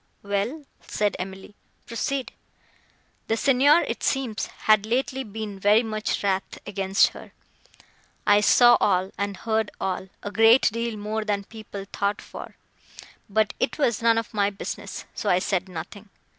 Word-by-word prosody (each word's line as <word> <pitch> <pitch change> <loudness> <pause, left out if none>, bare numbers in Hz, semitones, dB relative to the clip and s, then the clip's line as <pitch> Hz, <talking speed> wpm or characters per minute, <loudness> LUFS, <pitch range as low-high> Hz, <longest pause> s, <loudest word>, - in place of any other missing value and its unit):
"Well," 205 +9 -2 0.2
said 210 -1 0
Emily, 190 +2 -7 0.3
"proceed." 260 +3 -3 1.0
"The 225 - +1
Signor, 280 +6 +5
it - - -4
seems, 260 -6 -1
had 215 -2 +2
lately 260 +3 -1
been 210 -3 -6
very 210 +4 +4
wrath 210 -3 -2
against 195 -1 +2
her. - - -13 0.9
I 205 0 +5
saw 240 +3 +6
all, 190 -1 +2
and 200 -1 -2
heard 220 -1 -1
all,—a 190 +1 -4
great 225 +3 +5
deal 230 0 -3
more 215 +1 -3
than 205 -1 -1
people 205 -2 -9
thought 200 +1 -1
for; - - -10 0.7
but 215 0 +1
it - - -1
was 240 -8 +1
none 230 0 +4
of 230 0 -3
my 200 -1 +2
business, 200 -1 -7
so - - -2
I 180 - +4
said 190 0 -1
nothing. 195 +5 -8
210 Hz, 145 wpm, -25 LUFS, 200-230 Hz, 1.0 s, saw